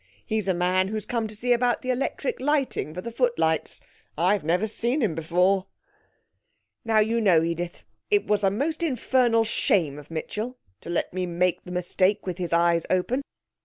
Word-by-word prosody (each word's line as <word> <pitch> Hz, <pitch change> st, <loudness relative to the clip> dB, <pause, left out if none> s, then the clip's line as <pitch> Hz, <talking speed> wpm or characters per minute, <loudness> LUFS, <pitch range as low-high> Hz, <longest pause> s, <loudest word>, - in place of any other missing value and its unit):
He's 215 Hz, -3 st, -1 dB
a 190 Hz, -, +2 dB
man 185 Hz, +2 st, +2 dB
who 215 Hz, -, -4 dB
has 215 Hz, -, -3 dB
come 230 Hz, -2 st, -1 dB
to 215 Hz, -, -7 dB
see 245 Hz, +3 st, +2 dB
about 240 Hz, +1 st, +1 dB
the 255 Hz, -, 0 dB
electric 275 Hz, -, -2 dB
lighting 275 Hz, -, 0 dB
for 180 Hz, +3 st, -6 dB
the 235 Hz, -, -6 dB
footlights. 225 Hz, -, 0 dB, 0.4 s
I've 185 Hz, +3 st, +2 dB
never 175 Hz, +6 st, +1 dB
seen 235 Hz, +5 st, -1 dB
him 220 Hz, -, +1 dB
before." 180 Hz, +4 st, +1 dB, 1.2 s
Now, 225 Hz, -1 st, +1 dB
you 225 Hz, +2 st, +3 dB
know, 175 Hz, -7 st, +4 dB
Edith, 170 Hz, +1 st, -3 dB, 0.3 s
it 410 Hz, -1 st, +3 dB
was 210 Hz, -1 st, +1 dB
a 195 Hz, -, +5 dB
most 290 Hz, -, -2 dB
infernal 250 Hz, -6 st, +2 dB
shame 170 Hz, -9 st, +1 dB
of 150 Hz, -, -14 dB
Mitchell 215 Hz, +9 st, -4 dB, 0.2 s
to -, -, -11 dB
let 175 Hz, -, -1 dB
me 185 Hz, 0 st, -2 dB
make 175 Hz, +1 st, 0 dB
the 180 Hz, -, -8 dB
mistake 185 Hz, +2 st, +1 dB
with 185 Hz, -1 st, -4 dB
his 175 Hz, -2 st, -2 dB
eyes 170 Hz, 0 st, +3 dB
open. 185 Hz, +9 st, +1 dB
200 Hz, 185 wpm, -25 LUFS, 175-235 Hz, 1.2 s, a